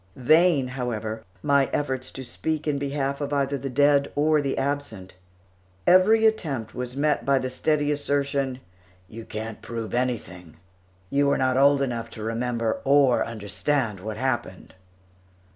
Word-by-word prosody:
Vain, 155 0 +3
however, 115 -4 -4 0.2
my 140 -1 +3
efforts 130 -3 -2
to 130 - -8
speak 155 +5 -3
in 145 -2 0
behalf 140 0 -2
of 145 0 -3
either 140 -1 0
the 135 0 -4
dead 140 +2 +3
or 150 +1 +3
the 140 -1 -2
absent; 135 -9 -3 0.7
every 210 +5 +5
attempt 145 - 0
was 125 +1 -5
met 150 +1 +1
by 140 0 +3
the 130 -1 -3
ready 150 -1 +3
assertion, 140 -2 -1 0.5
"You 115 +2 -10
can't 110 0 -6
prove 115 -1 -6
anything; 105 -10 -3 0.5
you 140 0 +2
were 140 - +2
not 130 -1 +1
old 140 +1 +4
enough 115 -3 -3
to 110 - -6
remember 115 0 -2
or 140 -2 +4
understand 115 +1 -2
what 105 +3 -6
happened." 120 -7 -3
135 Hz, 145 wpm, -25 LUFS, 115-145 Hz, 0.7 s, every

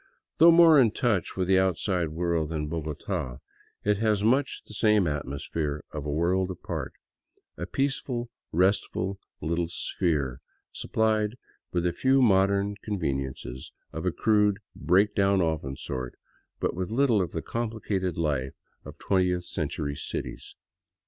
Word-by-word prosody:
Though 165 +2 +9
more 165 -3 +8
in 120 -4 +6
touch 105 -5 -1
with 90 -1 0
the 95 0 +5
outside 90 -2 +1
world 85 -1 -1
than 80 -2 -2
Bogota, 75 -5 -4 0.5
it 105 -1 +2
has 105 -1 +1
much 130 +5 +1
the - - -12
same 105 -2 +3
atmosphere 75 0 -3
of 75 -1 -5
a - - -1
world 90 +5 +1
apart, 95 - -5 0.6
a - - -5
peaceful, 135 -3 -2 0.2
restful 95 +1 +1 0.2
little 85 +2 0
sphere 75 -7 -1 0.3
suppHed 110 -1 0 0.4
with 90 -1 0
a 85 - +1
few 135 +1 +3
mod 100 -6 +5
ern 100 0 -1
conveniences 70 - -3 0.2
of 80 +3 -3
a - - +2
crude, 105 0 +3 0.2
break 90 +7 +3
down 100 0 +3
often 80 -6 -1
sort, 65 -1 -5 0.4
but - - 0
with 90 +2 -3
little 115 -3 +3
of 90 - -2
the 80 - -4
complicated 110 -6 -2
life 70 -5 -1 0.3
of - - -10
twentieth 90 -2 +1
century 70 -1 -3
cities. - - -6
95 Hz, 140 wpm, -27 LUFS, 80-105 Hz, 0.6 s, Though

